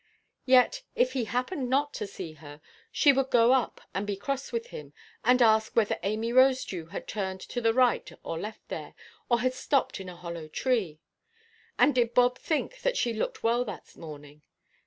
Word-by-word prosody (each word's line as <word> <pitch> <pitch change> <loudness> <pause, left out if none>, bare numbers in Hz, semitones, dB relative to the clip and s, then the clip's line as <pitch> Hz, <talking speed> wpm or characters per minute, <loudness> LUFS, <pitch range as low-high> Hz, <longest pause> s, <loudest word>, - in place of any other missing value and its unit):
Yet, 260 - +5
if 255 +1 +2
he 255 -4 -1
happened 250 - -2
not 285 +3 +1
to 210 - -4
see, 175 -5 -8 0.6
she 285 -3 +5
would 270 0 0
go 240 0 +5
up 260 -3 0
and 200 +2 -2
be 205 - -1
cross 275 +7 -4
with 470 +1 -3
him, 480 -2 -9 0.3
and 250 0 +5
ask 220 -1 +3
whether 220 -3 +2
Amy 215 +5 -1
Rosedew 255 -10 +3
had - - -7
turned 190 -2 -3
to 245 - -5
the 225 -1 +3
right 250 +1 +2
or 165 - -4
left 215 +4 -8
there, - - -6 0.3
or 240 -2 +3
had 255 0 +1
stopped 270 -2 0
in 190 -1 -7
a 180 - -9
hollow 170 -2 -7
tree. 185 -5 -1 0.8
And 290 - +5
did 240 -2 +1
Bob 250 0 +4
think 330 +10 -2 0.2
she 240 - 0
looked 220 - -3
well 235 +2 +2
that 205 - -9
morning? 150 -2 -11
235 Hz, 180 wpm, -28 LUFS, 195-255 Hz, 0.8 s, Yet